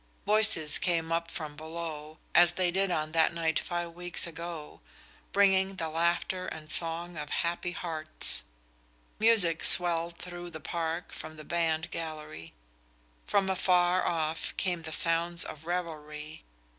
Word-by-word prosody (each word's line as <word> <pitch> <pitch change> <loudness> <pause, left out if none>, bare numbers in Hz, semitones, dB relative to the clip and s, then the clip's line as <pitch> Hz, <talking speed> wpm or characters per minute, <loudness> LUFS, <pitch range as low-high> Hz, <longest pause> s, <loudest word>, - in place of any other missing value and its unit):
Voices 210 -8 +4
came 165 -2 0
up 165 0 0
from 155 -3 -6
below, 155 -1 -7 0.2
as 175 0 +6
they 180 -1 +1
did 195 +2 +1
on 155 -3 -1
that 165 +1 +3
night 160 -2 +1
five 175 -1 -4
weeks 175 +1 0
ago, 165 -2 -8 0.5
bringing 195 -1 +3
the 165 -3 -3
laughter 170 +3 0
and 155 -1 -6
song 170 +1 -1
of 150 -1 -5
happy 175 +1 -1
hearts. 155 - +1 0.8
Music 210 -8 +4
swelled 170 -1 +5
through 175 -1 -8
the 160 -2 -8
park 165 +1 -3
from 155 0 -9
the 155 - -10
band 165 -1 -1
gallery; 155 - -7 0.8
from 200 -1 +2
afar 180 -1 +3
off 160 -1 -2
came 180 -3 -1
the 160 0 -7
sounds 170 +1 +2
of 155 +1 -9
revelry. 155 -3 -5
170 Hz, 140 wpm, -30 LUFS, 160-175 Hz, 0.8 s, as